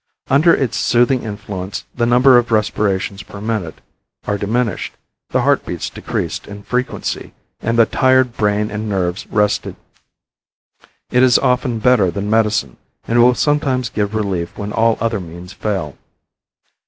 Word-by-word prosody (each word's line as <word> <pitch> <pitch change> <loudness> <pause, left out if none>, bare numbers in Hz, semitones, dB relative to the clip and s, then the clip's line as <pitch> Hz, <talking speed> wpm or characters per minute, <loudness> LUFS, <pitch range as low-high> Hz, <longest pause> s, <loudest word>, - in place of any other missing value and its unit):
Under 150 +5 +5
its 130 -8 +1
soothing 120 +2 +2
influence 100 -3 -6
the 120 -1 0
number 125 +1 +6
of 120 -1 -4
respirations 105 -2 0
per 100 - -11
minute 105 -7 -3 0.4
are 105 - 0
diminished, 110 0 -1 0.4
the - - +1
heart - - +2
beats - - -5
decreased - - -4
in 100 0 -9
frequency, 125 +5 -3 0.3
and 115 +1 -1
the 115 - +6
tired 130 0 +2
brain 105 0 0
and 105 +1 -4
nerves 95 -1 -2
rested. 105 -1 0 1.4
It 125 - +3
is 125 -1 +6
often 125 -1 +1
better 110 -4 +3
than 100 +4 -3
medicine, 105 - +1 0.3
and 120 +1 +3
will 125 +1 +5
sometimes 135 -5 +1
give 105 0 -2
relief 95 -5 -2
when 105 0 -5
all 115 0 +2
other 115 -2 -1
means 90 +1 -10
fail. 95 -10 -3
110 Hz, 145 wpm, -18 LUFS, 100-125 Hz, 1.4 s, number